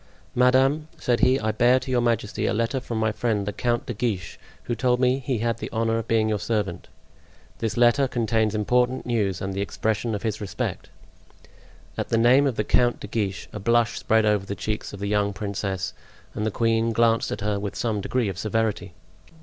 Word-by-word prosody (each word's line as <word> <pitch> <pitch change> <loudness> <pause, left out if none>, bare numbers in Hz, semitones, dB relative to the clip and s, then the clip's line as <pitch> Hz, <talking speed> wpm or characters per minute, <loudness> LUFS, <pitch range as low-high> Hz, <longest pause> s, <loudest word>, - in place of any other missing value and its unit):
"Madame," 130 +5 +3
said 120 -6 0
he, 130 +1 +4
"I 110 0 0
bear 120 +4 +4
to 130 +1 -6
your 125 -1 +2
majesty 115 -3 0
a - - 0
letter 115 +4 0
from 120 -2 -5
my 110 0 +1
friend 110 -3 -1
the 105 - -3
Count 120 +1 -1
de 120 - -4
Guiche, 100 -6 -3 0.2
who 120 - -2
told 125 +1 +1
me 130 +1 +2
he 130 -2 -2
had 115 +1 -1
the - - -5
honor 115 0 0
of 115 - -6
being 110 -1 +2
your 105 -1 0
servant; 100 -6 -2 0.7
this 115 0 -2
letter 120 +3 +4
contains 110 -3 0
important 125 +4 +1
news 105 -6 0
and 95 0 -3
the 100 - -2
expression 110 +2 -1
of 100 - -5
his 110 -1 -2
respect." 100 - -4 1.1
At - - -2
the 115 - +2
name 125 +5 +5
of 130 - -1
the 105 - 0
Count 120 +3 +2
de - - -7
Guiche 100 -3 -3
a 105 - -5
blush 115 +2 +2
spread 110 0 +2
over 105 -2 +2
the 100 - -3
cheeks 105 +2 -4
of 100 - -9
the 100 - -3
young 100 0 +1
princess 95 -3 -3 0.4
and 105 - -2
the - - +2
queen 115 +1 +1
glanced 115 0 +2
at - - -4
her 105 0 -1
with 100 -1 -5
some 110 -4 -1
degree 125 +2 0
of 95 -2 -4
severity. 110 -4 -1
110 Hz, 210 wpm, -24 LUFS, 105-120 Hz, 1.1 s, name